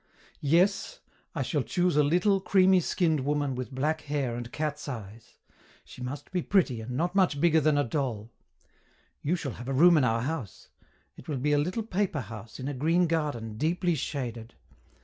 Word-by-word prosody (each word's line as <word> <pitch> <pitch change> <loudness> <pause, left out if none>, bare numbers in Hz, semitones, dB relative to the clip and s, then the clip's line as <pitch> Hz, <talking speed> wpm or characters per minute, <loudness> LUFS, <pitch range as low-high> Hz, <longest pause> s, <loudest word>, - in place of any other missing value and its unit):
"Yes 195 - +2 0.4
I - - 0
shall - - 0
choose 180 -3 0
a 150 - +5
little, 180 +6 +2
creamy 190 -1 +4
skinned 160 -2 +1
woman 145 0 0
with 130 0 -5
black 150 +4 -1
hair 140 -5 -2
and 120 0 -6
cat's 150 -1 -3
eyes. 110 -3 -9 0.5
She - - -12
must 130 +7 -6
be 180 -1 0
pretty 155 - +1
and 125 +3 -5
not 175 +4 0
much 185 -7 +2
bigger 160 0 +4
than 150 0 +3
a 145 - +3
doll. 120 -4 -3 0.9
You 160 +5 0
shall 150 -6 -4
have 120 +3 -9
a 135 - -1
room 170 +5 +6
in 145 - +3
our 115 -2 +1
house. 130 -6 -5 0.5
It - - -13
will 150 -4 -2
be 145 +4 0
a 145 - +4
little 180 +9 -1
paper 195 -7 -1
house, 110 +1 -9
in 130 - -4
a 145 - -2
green 165 +7 +2
garden, 145 -10 -2
deeply 175 +2 +1
shaded. 120 -6 -4
145 Hz, 190 wpm, -28 LUFS, 125-175 Hz, 0.9 s, room